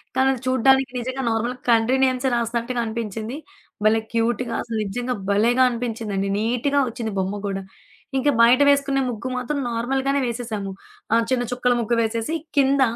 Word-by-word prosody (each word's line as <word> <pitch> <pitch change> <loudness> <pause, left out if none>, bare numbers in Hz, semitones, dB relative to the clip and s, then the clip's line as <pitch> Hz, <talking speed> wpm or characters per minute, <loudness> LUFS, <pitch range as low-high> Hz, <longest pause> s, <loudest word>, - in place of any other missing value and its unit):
కానీ 265 0 +3
అది 250 - -7
చూడడానికి 265 +1 +3
నిజంగా 260 +2 -4
నార్మల్‌గ 235 +3 -1
కంట్రీ 230 +3 +3
నేమ్సే 260 0 0
రాస్తనట్టుగా 235 +1 -1
అనిపించింది. 225 +2 -4 0.5
భలే 220 +1 +4
క్యూట్‌గా, 235 +1 0
అసలు 230 -2 -4
నిజ్జంగా 245 +5 -3
భలేగా 235 +5 +3
అనిపించిందండి. 220 -5 -3
నీట్‌గా 245 +6 +1
ఒచ్చింది 230 -3 -5
బొమ్మ 195 +2 -2
గూడా. 195 -1 -3 0.5
ఇంక 280 +2 +2
బయట 240 +3 +6
వేసుకునే 280 -1 +2
ముగ్గు 235 +3 -6
మాత్రం 280 +4 -2
నార్మల్‌ 255 +4 -1
గానే 280 0 +2
వేసేశాము. 225 -5 -4 0.4
ఆహ్, 230 0 +3
చిన్న 245 -1 +2
చుక్కల 250 0 +2
ముగ్గు 235 +1 0
వేసేసి, 225 +6 -2 0.2
కింద 275 0 +4
235 Hz, 155 wpm, -22 LUFS, 225-260 Hz, 0.5 s, బయట